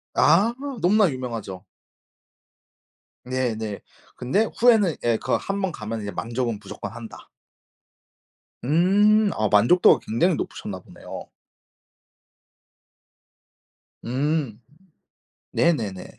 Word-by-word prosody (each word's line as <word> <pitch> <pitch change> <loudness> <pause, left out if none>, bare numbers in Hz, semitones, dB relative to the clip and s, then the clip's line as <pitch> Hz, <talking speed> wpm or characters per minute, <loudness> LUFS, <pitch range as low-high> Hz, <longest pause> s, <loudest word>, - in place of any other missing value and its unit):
아 225 +4 +4 0.3
너무나 200 +3 +4
유명하죠. 115 -8 -6 1.6
네네 115 -5 -3 0.4
근데 195 - +1
후에는 220 - +4
예 120 -1 +2
그 - - -1
1 200 0 -4
번 190 -3 -1
가면은 110 -2 -6
이제 100 - -5
만족은 115 +2 -3
무조건 - - -8
한다. - - -11 1.4
음, 200 - +3
아 110 - 0
만족도가 115 - +5
굉장히 145 +12 +1
높으셨나 - - -6
보네요. - - -10 2.8
음, 135 -2 -1 0.9
네네네. 110 - -1
130 Hz, 190 characters per minute, -23 LUFS, 110-190 Hz, 2.8 s, 만족도가